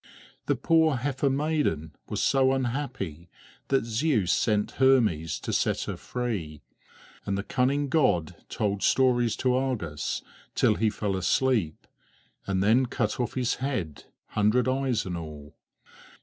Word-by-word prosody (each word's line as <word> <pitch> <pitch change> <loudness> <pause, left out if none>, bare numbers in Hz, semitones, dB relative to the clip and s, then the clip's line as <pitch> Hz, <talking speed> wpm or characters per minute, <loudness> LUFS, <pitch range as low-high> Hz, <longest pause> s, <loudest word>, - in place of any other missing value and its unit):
The - - +2
poor 160 -3 +3
heifer 135 +2 0
maiden 135 - -1 0.2
was - - -1
so 135 -1 +3
unhappy 120 - -3 0.4
that 135 -4 +1
Zeus 115 - +1
sent 105 -2 +1
Hermes 110 - +3
to - - -4
set - - +1
her - - -4
free; 95 - -4 0.6
and 100 - -2
the 100 - -2
cunning 135 +5 0
god 115 - +1
told 100 -2 -1
stories 120 -3 +3
to 125 +2 +1
Argus 120 - -2 0.3
till 110 - +4
he 110 +1 +1
fell 105 -2 -2
asleep, 95 -2 0 0.6
and 95 -1 0
then 120 +5 +4
cut 110 -2 -2
off 120 - -2
his 125 -2 0
head, 125 - -3 0.2
hundred 105 +5 +2
eyes 130 -3 0
and 90 -2 -4
all. 75 -3 -9
120 Hz, 135 wpm, -27 LUFS, 95-130 Hz, 0.6 s, till